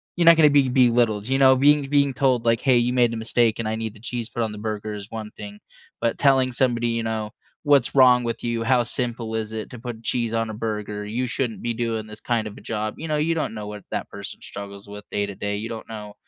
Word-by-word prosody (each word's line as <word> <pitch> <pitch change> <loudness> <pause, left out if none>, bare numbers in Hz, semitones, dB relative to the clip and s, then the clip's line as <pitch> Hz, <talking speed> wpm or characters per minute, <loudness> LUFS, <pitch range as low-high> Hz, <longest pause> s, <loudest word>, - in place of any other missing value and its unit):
you're 175 - +1
not 170 0 +8
gonna 150 -2 +7
be 140 -2 +4
belittled. 120 -4 +3
You 135 +1 +1
know? 130 -1 +7
Being 145 +1 +4
being 140 -1 +3
told, 130 -3 +1
like, 115 -1 +2
"Hey. 130 -2 +4
You 120 +1 +1
made 120 -2 +3
a 115 - -3
mistake, 115 0 +1
and 115 - -2
I 110 - -1
need 110 -1 -5
the 105 - -14
cheese 120 0 -4
put 115 +1 -2
on 110 - -2
the 105 - -8
burger," 105 0 -4
is 100 0 -8
one 110 -1 -6
thing. 105 0 -10 0.4
But 115 - 0
telling 135 -2 +4
somebody, 120 -2 +1
you 115 0 -1
know, 110 -1 -3 0.3
"What's 140 -4 +3
wrong 125 -2 +6
with 115 -1 -4
you? 115 -1 -1
How 125 0 +3
simple 120 -2 -2
is 110 0 -3
it 110 -1 -5
to 125 - -9
put 115 -2 -7
cheese 115 -1 -1
on 115 -1 0
a - - -7
burger? 105 -1 -4
You 120 +5 -2
shouldn't 125 -2 -3
be 120 0 -1
doing 115 -2 -2
this 110 0 -11
kind 115 -3 0
of 105 - -10
a - - -12
job." 110 -1 -3
You 160 - -5
know? 155 - +1
You 160 +2 +1
don't 155 -7 -2
know 105 - -6
what 105 -1 -8
that - - -3
person 100 0 -8
struggles 100 0 -9
with 105 0 -8
day 100 - 0
to 100 - -6
day. 100 0 -2
You 110 +2 -5
don't 115 -1 -7
know 105 -2 -8
115 Hz, 265 wpm, -23 LUFS, 110-125 Hz, 0.4 s, not